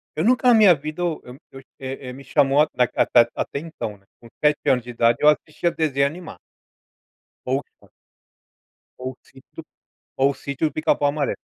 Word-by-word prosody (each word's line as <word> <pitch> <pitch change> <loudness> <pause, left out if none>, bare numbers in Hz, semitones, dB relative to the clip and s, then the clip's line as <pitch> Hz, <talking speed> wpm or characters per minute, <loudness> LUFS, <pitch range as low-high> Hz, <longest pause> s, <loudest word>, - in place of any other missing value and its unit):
Eu - - -1
nunca 250 +2 +3
na 245 - +7
minha 210 -5 +7
vida 155 +4 -7
eu 170 -3 -2 0.3
eu, 135 - -11 0.2
é 135 -1 -7
é - - -7
me 140 +1 -11
chamou 135 +3 +3
a 155 - +3
a 125 -1 +1 0.3
a - - -2
atenção, 140 -8 -6
né, 100 - -31
com 115 - -15 0.2
7 150 0 +3
anos 125 -3 +2
de 120 - -12
idade 115 0 +2
eu 150 - +4
assistia 155 +3 0
desenho 140 -3 +1
animado 170 +4 -9 1.1
ou 135 +2 0
Chaves - - -27 1.1
ou 130 0 -6
sítio 135 -1 -14 0.6
ou 135 - +5
sítio 140 +3 -1
de - - -7
pica 155 - +2
pau 145 - 0
amarelo. 145 -1 -2
140 Hz, 180 wpm, -22 LUFS, 130-155 Hz, 1.1 s, na